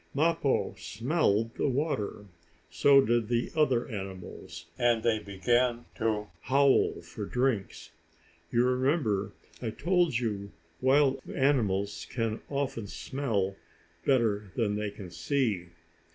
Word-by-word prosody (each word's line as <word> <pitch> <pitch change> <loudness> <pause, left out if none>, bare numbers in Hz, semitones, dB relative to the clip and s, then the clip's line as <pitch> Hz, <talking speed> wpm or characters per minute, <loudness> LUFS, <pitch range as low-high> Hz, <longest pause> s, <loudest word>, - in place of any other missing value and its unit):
Mappo 160 -2 +1
smelled 115 - 0
the - - 0
water. 130 -7 -2 0.5
So 135 +11 +6
did 120 -3 +1
the 120 0 0
other 130 -6 +2
animals, 95 -5 -7
and 120 -2 +3
they 115 -2 +2
began 120 +5 0
to 110 -2 0 0.2
howl 135 +3 +3
for - - -6
drinks. 125 -6 -1 0.6
You 120 +1 +3
remember 125 - +1 0.3
I 120 - -2
told 175 - +1
you 105 -4 -3 0.3
wild 135 0 +4
animals 105 -8 +1
can 115 -3 -2
often 140 -6 -2
smell 105 -6 -2 0.5
better 105 -7 +1
than 110 -4 +1
they 105 0 -2
can 100 -3 -10
see. 95 +1 -1
120 Hz, 115 wpm, -29 LUFS, 105-135 Hz, 0.6 s, So